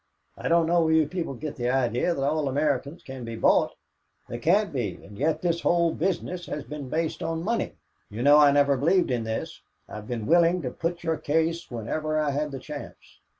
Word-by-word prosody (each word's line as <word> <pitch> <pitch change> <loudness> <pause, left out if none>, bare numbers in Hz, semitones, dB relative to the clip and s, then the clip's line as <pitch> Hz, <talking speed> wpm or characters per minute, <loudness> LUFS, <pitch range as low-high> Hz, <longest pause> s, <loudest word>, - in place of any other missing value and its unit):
I - - -5
don't 170 0 +4
know 170 +1 +3
where 160 -1 +2
you 160 -1 +4
people 165 -5 -4
get 150 +3 -6
the 120 -1 -1
idea 130 +5 +1
that 135 - -2
all 150 +1 0
Americans 145 +2 -1
can 130 -2 -8
be 115 0 -5
bought. 115 - +3 0.5
They 120 - -5
can't 190 - +2
be, 115 -9 -2
and 100 +1 -14
yet 150 - 0
this 170 -1 0
whole 170 -1 +2
business 175 0 -2
has 150 - -4
been 145 -2 -7
based 160 +3 -2
on 165 0 -2
money. 230 +4 -1 0.3
You 110 +4 -4
know 145 +2 +7
I 145 -1 +7
never 140 -1 +3
believed 170 +3 +2
in 120 -2 -1
this. 110 0 -4 0.3
I - - -8
have 105 0 -9
been 115 -3 -3
willing 170 +2 +4
to 125 - -3
put 170 +4 -3
your 165 -1 0
case 165 +3 -1
whenever 155 +7 -2
I 150 -2 +1
had 150 +2 -1
the 135 - -6
chance. 145 +2 -10
150 Hz, 215 wpm, -26 LUFS, 130-165 Hz, 0.5 s, know